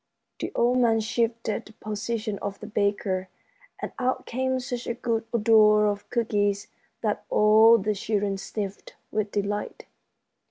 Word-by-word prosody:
The - - -3
old 245 +2 +3
man 230 -2 +3
shifted 230 0 -1
the 215 - -15
position 215 0 -4
of 200 -1 -5
the - - -8
baker, 200 -3 -1 0.5
and - - -5
out 255 0 -1
came 260 +1 -1
such 250 -1 -5
a 235 - -2
good 230 -2 -1
odor 215 -2 +5
of 205 0 -2
cookies 205 -4 0 0.3
that 210 -2 -1
all 220 +2 +6
the 215 0 0
children 205 -1 -1
sniffed 200 0 -6 0.2
with 215 -1 -1
delight. 205 +1 -3
215 Hz, 145 wpm, -26 LUFS, 205-230 Hz, 0.5 s, all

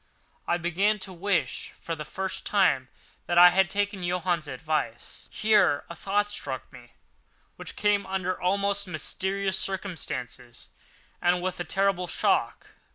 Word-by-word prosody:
I 175 - +2
began 180 +5 +1
to 190 -1 -6
wish, 190 +2 -1
for 165 - -4
the 150 -1 -6
first 190 +3 -4
time, 145 -11 +2 0.4
that 175 - 0
I 175 0 +10
had 190 0 +3
taken 200 0 -1
Johann's 175 -3 -1
advice. 140 -4 -3
Here 210 -9 +3
a - - -7
thought 205 +4 0
struck 205 - -5
me, - - -14 0.6
which - - -8
came 205 -1 +1
under 185 -1 -2
almost 200 +2 +1
mysterious 190 +4 -2
circumstances 155 - -5 0.5
and 175 +1 +3
with 185 0 -3
a - - -1
terrible 195 -2 +1
shock. - - 0
185 Hz, 140 wpm, -27 LUFS, 175-200 Hz, 0.6 s, I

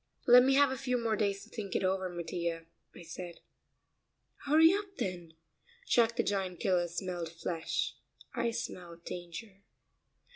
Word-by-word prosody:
"Let 245 0 +9
me 270 +2 +4
have 285 -1 +5
a 265 - -3
few 250 -1 0
more 230 -2 0
days 200 -2 0
to - - -16
think 205 -5 -5
it - - +1
over, 190 0 +1
Mattia," 170 -1 -3 0.3
I - - -10
said. 170 +1 -8 1.1
"Hurry 320 +4 +6
up, 400 -1 -3
then. 175 -3 -4 0.5
Jack 235 - +3
the - - +2
Giant 190 -3 -1
Killer 180 -3 +2
smelled 175 -1 -4
flesh 165 0 -2 0.4
I 235 - 0
smell 175 -6 -5
danger." 175 +4 -8
190 Hz, 150 wpm, -32 LUFS, 175-235 Hz, 1.1 s, Let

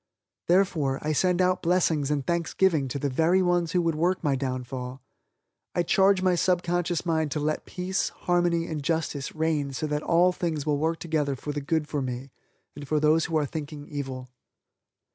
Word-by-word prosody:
Therefore, 165 -7 +2
I 155 +1 0
send 180 +3 +2
out 180 0 +1
blessings 165 -5 +1
and 145 -3 -1
thanksgiving 170 -2 +1
to 130 - -4
the 140 - -1
very 165 +7 +2
ones 175 -2 +1
who 180 -1 +2
would 165 -1 +1
work 175 +4 0
my 145 -3 +2
downfall. 130 -1 -4 0.8
I 175 - +2
charge 190 +2 +3
my 185 -1 +4
subconscious 175 -1 0
mind 160 -2 +1
to 150 - -1
let 155 +1 -2
peace, 185 +1 -2
harmony 175 -1 0
and 155 -3 -4
justice 155 -2 -2
reign 155 -3 0
so 135 - -3
that 150 -1 -1
all 175 +3 +4
things 165 -5 -3
will 145 -2 +1
work 165 +2 0
together 155 -5 -1
for 145 +3 -5
the 145 - -3
good 155 +1 -1
for 145 -2 -2
me 130 +1 -5 0.4
and 145 0 -8
for 155 +1 +1
those 155 +2 +3
who 165 - 0
are 150 - +1
thinking 145 0 -6
evil. 130 -3 -5
160 Hz, 185 wpm, -26 LUFS, 145-175 Hz, 0.8 s, my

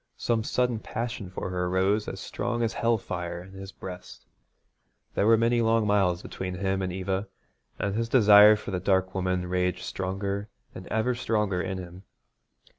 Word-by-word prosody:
Some 115 -2 0
sudden 125 0 0
passion 115 -3 -5
for 95 0 -5
her 90 -1 -1
rose 95 +3 +1
as 95 - -5
strong 120 +3 -2
as 115 - 0
hell 115 -1 +2
fire 85 -3 -5
in 95 - -14
his 95 0 -8
breast. 90 -2 -10 0.9
There 100 - +1
were 115 0 +6
many 115 +1 +2
long 115 -1 +2
miles 95 -4 +2
between 90 -1 -5
him 95 +1 -1
and 95 -1 -2
Eva, 95 +2 -2 0.5
and 100 - -1
his 115 +2 -1
desire 105 -3 +8
for 105 - -7
the 90 - -1
dark 95 -1 +1
woman 90 -1 -1
raged 90 0 -1
stronger 100 +2 -3 0.2
and 95 - -9
ever 110 +3 0
stronger 105 -6 0
in 95 0 -3
him. 90 0 -9
95 Hz, 175 wpm, -27 LUFS, 95-110 Hz, 0.9 s, desire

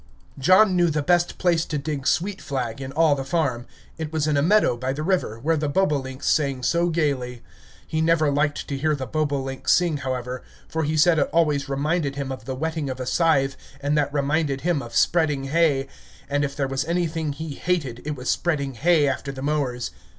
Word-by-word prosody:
John 185 +7 +5
knew 175 -1 +3
the 150 -1 -1
best 175 +2 +2
place 170 -3 +2
to 150 - -3
dig 140 -1 -3
sweet 190 +3 0
flag 130 -3 -3
in 135 0 -5
all 155 +1 +3
the 135 -1 -2
farm; 135 -5 -1 0.3
it 155 -1 -4
was 155 -2 0
in 155 -1 +1
a 140 - +3
meadow 200 - +3
by 130 +2 -2
the 150 +2 -4
river, 175 - 0
where 160 +7 +1
the 150 -1 -1
bobolinks 140 -6 -1
sang 140 -4 +1
so 170 +6 +2
gayly. 135 -7 -1 0.4
He 160 - -2
never 160 -2 +3
liked 145 +1 0
to 140 - -2
hear 155 +1 +1
the 135 -2 -4
bobolink 140 -3 -2
sing, 175 -4 +3
however, 130 -2 -4 0.3
for 160 -1 -2
he 155 +1 -1
said 160 +1 +5
it - - +1
always 150 -4 +1
reminded 145 +1 -1
him 140 -1 -4
of 130 -4 -7
the 130 0 -4
whetting 160 0 -2
of 130 0 -5
a 130 - -3
scythe, 135 -2 +2 0.2
and 145 +1 0
that 145 -1 +1
reminded 145 -1 0
him 170 -4 0
of 120 -2 -9
spreading 155 -4 +2
hay; 140 -1 +2 0.4
and 145 0 0
if 140 0 -3
there 140 -3 -1
was 135 0 -1
anything 165 -2 -1
he 155 +1 -6
hated, 140 -7 -2
it 150 0 -3
was 125 -1 -8
spreading 140 -6 0
hay 150 +4 +3
after 140 +1 -2
the 135 -1 -7
mowers. 140 -5 -1
145 Hz, 210 wpm, -24 LUFS, 135-160 Hz, 0.4 s, John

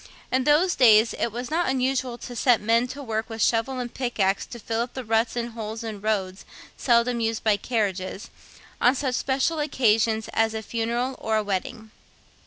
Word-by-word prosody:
In 260 0 +1
those 330 +5 +4
days 225 -2 +5
it 235 - 0
was 240 +4 -6
not 335 -2 +1
unusual 260 -1 0
to 245 0 -9
set 240 -1 +3
men 230 +3 +2
to 280 +3 -8
work 220 -2 -3
with 225 0 -7
shovel 235 +3 +1
and 245 -1 -5
pickaxe 205 -7 0
to 240 - -9
fill 225 0 -2
up 240 +2 -5
ruts 225 -2 0
and 240 0 -3
holes 225 0 -6
in 215 -3 -6
roads 195 -3 -2 0.3
seldom 235 0 +2
used 225 -1 -1
by 215 -2 +4
carriages, 200 -3 -3 0.5
on 250 - +5
such 265 -1 -1
special 270 +6 0
occasions 225 -6 +1
as 225 0 +1
a 220 - -4
funeral 235 +4 -2
or 220 0 0
a 215 - 0
wedding. 215 +3 -4
230 Hz, 185 wpm, -25 LUFS, 220-255 Hz, 0.5 s, days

